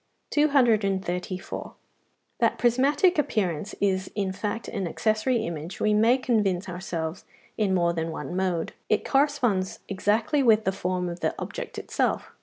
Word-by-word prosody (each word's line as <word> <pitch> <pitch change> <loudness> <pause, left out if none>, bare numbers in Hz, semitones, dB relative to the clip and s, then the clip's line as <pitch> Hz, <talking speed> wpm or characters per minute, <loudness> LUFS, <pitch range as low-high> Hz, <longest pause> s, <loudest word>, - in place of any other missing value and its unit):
234. 200 - +1 0.7
That - - +3
the - - -18
prismatic 280 +9 +3
appearance 200 - -1
is 190 -1 0
in 195 -2 -1
fact 210 +3 -3
an 195 -5 -3
accessory 220 +6 0
image 165 +1 -6
we 215 - +2
may 225 +4 +4
convince 210 -8 0
ourselves 175 -2 -4 0.3
in 200 -3 +1
more 170 -1 +2
than 165 0 -2
one 165 +2 -5
mode. 180 -3 -1 0.2
It 215 - +1
corresponds 255 -10 +1
exactly 215 +9 +1
with 220 -4 +5
the 190 - +1
form 180 -1 -2
of 170 0 -5
the - - -1
object - - -6
itself. - - -1
200 Hz, 145 wpm, -26 LUFS, 180-235 Hz, 0.7 s, with